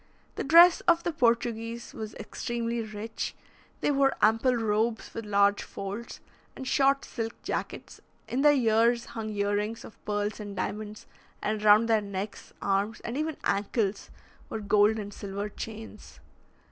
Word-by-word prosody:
The - - -3
dress 340 +4 +7
of 340 -1 +4
the 345 - 0
Portuguese 235 -3 0
was 220 -1 -7
extremely 235 +2 -3
rich; 220 0 -5 0.5
they - - +2
wore 275 -1 +3
ample 225 +4 +3
robes 225 0 0
with 225 -2 -6
large 200 0 +3
folds, 200 +4 -7 0.3
and 265 - -7
short 275 +1 +3
silk 225 -2 -5
jackets; - - -5 0.3
in 255 - -1
their 295 +1 +7
ears 235 -1 +3
hung 220 -1 -4
ear 205 -1 -1
rings 210 +2 -3
of - - -15
pearls 205 +1 -2
and 205 -1 -7
diamonds, 210 +2 -4 0.3
and 215 0 -2
round 215 +2 +6
their 220 -2 +3
necks, 200 0 -6
arms, 200 +3 0
and 235 - -5
even 310 +1 -2
ankles, 200 +1 -1 0.4
were 220 - -4
gold 210 +1 +3
and 205 -1 -6
silver 200 +1 -5
chains. 220 - -9
220 Hz, 150 wpm, -28 LUFS, 205-235 Hz, 0.5 s, dress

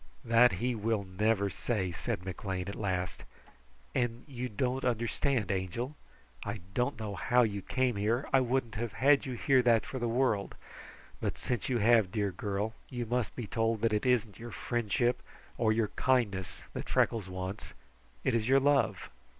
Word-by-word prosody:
"That 115 -1 +6
he 120 +8 0
will 110 -1 0
never 100 +2 +1
say," 95 -3 -1
said 85 +2 -3
McLean 95 -1 -4
at 100 - -4
last, 90 -5 -2 0.7
"and 120 -1 -1
you 125 -2 -4
don't 130 +4 -1
understand, 120 -1 0
Angel. 100 +9 -3 0.5
I 105 -1 -4
don't 125 +1 0
know 105 -2 -4
how 125 +4 +3
you 100 -3 -1
came 125 +1 0
here. 115 +6 0
I 135 - +7
wouldn't 125 -2 0
have 110 +1 -3
had 140 +1 +4
you 130 - -3
hear 130 +2 +3
that 115 -3 +4
for 130 - -5
the 120 - 0
world, 115 -4 +1 0.6
but - - -2
since 120 -2 -2
you 125 - +2
have, 110 -3 +4
dear 105 -3 0
girl, 100 +4 -2 0.2
you 120 -2 -3
must 120 0 -1
be 120 - -4
told 115 0 0
that 115 -1 +2
it 105 +4 +1
isn't 115 -5 +1
your 120 +1 -7
friendship 120 +1 0 0.4
or 110 -2 +3
your 110 -1 +1
kindness 105 -9 0 0.2
Freckles 110 -5 +1
wants; 95 +2 -6 0.5
it - - +1
is 115 -1 +1
your 135 +1 +6
love." 145 0 +2
115 Hz, 170 wpm, -31 LUFS, 100-125 Hz, 0.7 s, I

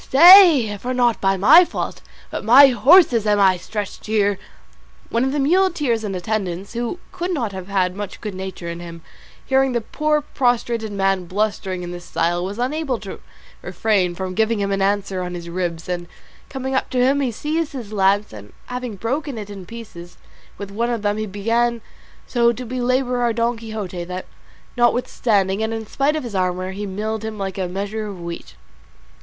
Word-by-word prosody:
stay, 320 - +7
for 255 +4 -3
not 240 -2 +2
by 195 0 +2
my 290 - +8
fault, - - -5 0.3
but - - -4
my 265 +6 +8
horse's, 250 - +5
am 205 -1 +3
I 190 -2 +5
stretched 210 +3 -6
here." 205 -2 +1 0.7
One 230 +2 +1
of 265 - 0
the 295 - -2
muleteers 295 -7 +1
in 200 -3 -3
attendance, 190 0 -3
who 240 +7 -3
could 355 +1 -4
not 245 - -2
have 190 -1 -7
had 185 -2 0
much 205 0 -6
good 210 -3 -6
nature 190 -2 -7
in 170 0 -5
him, 170 -1 -10 0.4
hearing 265 -1 +2
the 240 - +1
poor 305 +6 0
prostrate 240 -5 -1
man 195 -2 0
blustering 190 -1 -2
in 175 - -6
this 175 0 -8
style, 175 +1 -1
was 195 +3 -5
unable 265 +1 -1
to 195 -2 -8 0.4
refrain 185 -1 0
from 185 0 -4
giving 220 +2 +1
him 200 0 -1
an 195 0 0
answer 195 -1 0
on 180 0 -5
his 170 -1 -7
ribs; 170 -2 -3
and 175 -1 -4 0.4
coming 265 -1 -4
up 265 - 0
to 255 - -3
him 265 +3 +3
he 260 -3 0
seized 305 +6 -2
his 230 -6 -7
lance, 200 - +2
and 105 -1 -12
having 250 -3 -5
broken 265 +6 -3
it 205 -1 -7
in 195 -3 -9
pieces, 195 -7 -10 0.4
with 200 -1 -7
one 230 +4 -1
of 235 -3 -2
them 205 0 0
he 215 0 -3
began 230 +4 0 0.5
so 235 -1 +2
to 245 +2 -6
belabour 250 +1 0
our 240 -1 +1
Don 235 +1 0
Quixote 215 -6 -6
that, 180 +1 -6 0.5
notwithstanding 220 -5 +1
and 220 0 -1
in 225 -1 -4
spite 280 +7 0
of 310 - -3
his 235 -4 -7
armour, 185 0 -1
he 205 +2 -5
milled 215 +3 -4
him 220 -1 -5
like 195 -1 -4
a 185 - -1
measure 205 +4 -4
of 195 -3 -8
wheat. 170 0 -8
215 Hz, 190 wpm, -21 LUFS, 190-245 Hz, 0.7 s, my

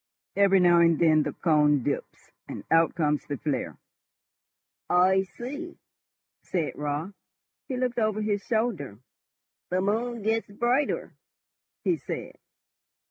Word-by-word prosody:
Every 195 -1 +5
now 175 -1 +5
and 170 -1 +4
then 155 -1 +4
the - - -2
cone 150 -4 +2
dips, 140 - -4 0.2
and - - -7
out 165 0 +4
comes 150 -3 0
the 145 - -3
flare." 140 -3 -3 1.1
"I 185 +2 +4
see," 265 - -7 0.6
said 170 -4 -2
Raut. 150 +6 -3 0.5
He 260 -3 -3
looked 250 -1 -1
over 215 -1 0
his 205 -1 -1
shoulder. 220 - -1 0.7
"The 180 - 0
moon 225 +4 -1
gets 225 +1 0
brighter," 240 +7 0 0.7
he - - +1
said. - - -7
190 Hz, 125 wpm, -27 LUFS, 155-225 Hz, 1.1 s, Every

